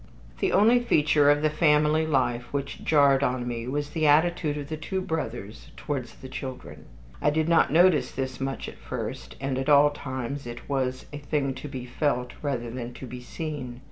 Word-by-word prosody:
II - - -23
The - - -2
only 230 +4 +6
feature 150 -10 +3
of 145 +1 +3
the 155 - +4
family 155 0 +3
life 120 -4 0
which 140 -1 -4
jarred 140 -3 +4
on 125 -3 0
me 120 -1 -4
was 145 +2 -2
the 155 0 +1
attitude 155 0 +3
of 145 -1 -5
the 155 - -4
two 175 +5 -3
brothers 120 - -5
towards 135 -5 -4
the 130 - -10
children. 130 0 -8 0.4
I - - +3
did 155 +1 +1
not 170 -4 +4
notice 175 0 +4
this 130 -1 -4
much 135 0 -3
at - - -10
first, - - -6
and 135 -1 -2
at 135 +2 -2
all 145 0 +6
times 130 -1 -5
it 120 0 -8
was 130 -2 -1
a 145 - -5
thing 140 -2 -1
to 130 +3 -8
be 130 -3 -6
felt 125 -1 -1
rather 125 -5 -2
than 120 0 -6
to - - -8
be 125 0 -8
seen. 130 -3 -6
140 Hz, 200 wpm, -26 LUFS, 125-150 Hz, 0.4 s, only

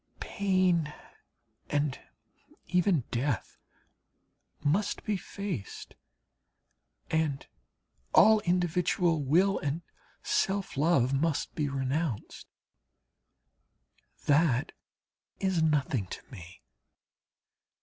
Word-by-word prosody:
Pain 185 -6 +1 0.8
and 145 -2 0 0.7
even 180 -4 +2
death 125 -2 -2 1.0
must 170 +8 0
be 210 - 0
faced, 190 - -6 1.2
and 155 -4 0 0.7
all 220 +1 +7
individual 175 -2 +1
will 180 +8 +3
and 145 +4 -3 0.4
self 195 0 0
love 140 -3 +3
must 150 +2 0
be 150 -2 -1
renounced. 135 -2 -3 1.8
That 145 -3 +3 0.7
is 190 -4 +1
nothing 140 -9 +1
to - - -7
me. 90 -5 -12
160 Hz, 75 wpm, -29 LUFS, 140-180 Hz, 1.8 s, all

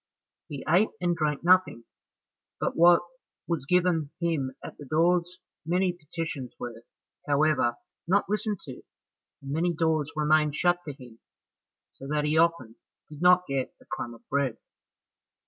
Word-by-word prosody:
He 140 -3 -7
ate 180 +7 +4
and 175 -1 +1
drank 150 -2 -1
nothing 185 -9 +3 0.8
but - - -1
what 170 +1 +6 0.4
was 160 -6 -2
given 175 -4 +2
him 155 -7 -1
at - - -8
the 145 - -9
doors; 175 +4 +1 0.3
many 180 +3 +1
petitions 155 -5 -6
were, 120 -1 -6 0.5
however, 145 -4 +2 0.3
not 200 +3 +2
listened 210 -1 -2
to, 130 -4 -10 0.6
and 135 - -6
many 170 +3 0
doors 155 -2 0
remained 150 -1 +2
shut 175 +2 +2
to 145 - -4
him, 125 -4 -14 0.7
so 135 - -10
that 150 +1 0
he 150 +1 +1
often 160 -9 +1 0.3
did 150 0 -11
not 180 0 +5
get 135 -2 -2
a - - -20
crumb 120 0 -5
of 115 - -21
bread. 140 -4 0
155 Hz, 145 wpm, -27 LUFS, 140-175 Hz, 0.8 s, what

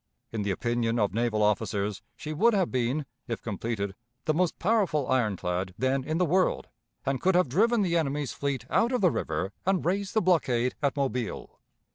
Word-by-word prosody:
In 110 - -2
the 100 - -1
opinion 120 +3 0
of 105 -4 +1
naval 115 -1 +1
officers 105 -1 0
she 155 +1 -6
would 225 +8 +4
have 190 -4 +1
been, 130 +4 0 0.2
if 115 -3 -4
completed, 105 -2 -3 0.3
the 155 - +2
most 175 +1 +1
powerful 185 - +1
ironclad 95 -7 0
then 130 +1 +1
in 155 +4 -2
the 180 - +3
world, 185 +3 +1 0.4
and 135 -1 -1
could 190 0 +3
have 180 -3 +4
driven 220 - +3
the 175 -3 +1
enemy's 145 -3 0
fleet 140 -4 -2
out 235 - +3
of 250 - 0
the 180 -4 +5
river 80 - -2
and 190 -1 +1
raised 195 +3 -1
the - - +5
blockade 125 -9 +2
at 140 -1 0
Mobile. 125 -4 -3
135 Hz, 185 wpm, -28 LUFS, 115-180 Hz, 0.4 s, the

